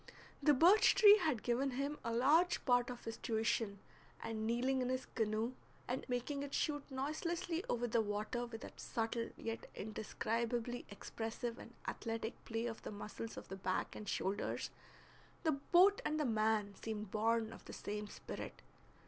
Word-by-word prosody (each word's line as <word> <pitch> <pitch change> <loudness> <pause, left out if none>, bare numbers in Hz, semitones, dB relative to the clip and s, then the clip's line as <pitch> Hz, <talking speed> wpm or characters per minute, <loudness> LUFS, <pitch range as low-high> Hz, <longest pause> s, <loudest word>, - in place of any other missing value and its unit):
The 295 -2 +6
birch 355 +10 +7
tree 420 0 +9
had 305 - 0
given 250 +3 +1
him 285 +2 -1
a 230 - -1
large 300 +10 +4
part 245 -1 +4
of 245 -1 -6
his 225 - -4
tuition, 220 -2 0 0.5
and 220 -1 -2
kneeling 255 +3 +2
in 250 - 0
his 255 0 -1
canoe 220 +2 -1 0.3
and 255 +2 -3
making 250 +3 -1
it 280 -1 -3
shoot 290 -1 +1
noiselessly 325 +5 -2
over 245 0 +1
the 235 -1 +2
water 215 +3 -2
with 225 -1 -8
that - - -10
subtle 230 0 -2
yet 225 0 -5
indescribably 230 +3 -2
expressive 225 +3 -4
and 235 - -11
athletic 225 0 -3
play 225 +1 -2
of 225 -2 -4
the - - -6
muscles 215 +2 -6
of - - -7
the 190 - -4
back 185 -1 -1
and 210 - -6
shoulders, 195 +2 -1 0.7
the 315 - +4
boat 355 +8 +5
and 310 0 0
the 300 - +2
man 215 -3 +2
seemed 215 -2 -4
born 225 +1 +1
of - - -13
the - - -8
same 210 0 -4
spirit. - - -7
235 Hz, 165 wpm, -37 LUFS, 220-270 Hz, 0.7 s, tree